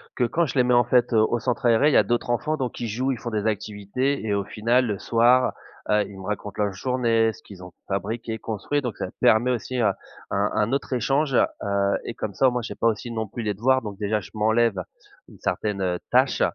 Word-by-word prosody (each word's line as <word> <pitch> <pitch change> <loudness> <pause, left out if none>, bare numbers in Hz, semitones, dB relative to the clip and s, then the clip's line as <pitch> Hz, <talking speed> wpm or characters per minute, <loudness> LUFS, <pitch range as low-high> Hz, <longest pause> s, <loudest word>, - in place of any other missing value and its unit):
que 125 - 0
quand 165 +8 +1
je 145 - -5
les 125 - +4
mets, 125 0 +2
en 120 0 +5
fait, 125 0 +2
au 110 +2 +3
centre 125 0 -2
aéré, 120 +5 +5
il - - 0
y - - +6
a - - +6
d'autres 120 +4 -1
enfants 120 +6 0
donc 130 -4 -4
ils 120 - -3
jouent, 125 +5 -1
ils 125 - -3
font 120 - -5
des 105 -2 -2
activités 110 +5 -2
et 105 - 0
au 100 0 0
final 115 +5 +1
le 105 -2 -2
soir, 120 +2 +3 0.4
heu, 105 0 +3
ils 100 - -11
me 95 - -9
racontent 105 0 -4
leur 100 -1 -1
journée 115 0 +1
ce - - -17
qu'ils 95 -3 -12
ont 90 - -10 0.2
fabriqué, 110 +3 -3
construit, 115 +8 -2
donc 125 -5 -4
ça - - -3
permet 120 +3 +4
aussi, 125 +1 -3
heu, 110 - +3 0.4
un 100 +1 +1
un 110 +1 +1
autre 140 0 -1
échange. 135 +3 +1
Heu, 100 -3 +1
et - - -4
comme 105 -2 -5
ça 130 +8 +4
moi, 125 0 -2
j'ai 115 - -6
pas 115 - +1
aussi 115 +1 -1
non 110 -1 -3
plus 115 +3 -6
les 105 -1 -1
devoirs, 130 +6 +2
donc 105 -3 -7
déjà 105 0 0
je - - -13
m'enlève 110 -2 +2 0.5
une - - -16
certaine 95 -4 -1
tâche - - +3
115 Hz, 240 wpm, -24 LUFS, 105-125 Hz, 0.5 s, y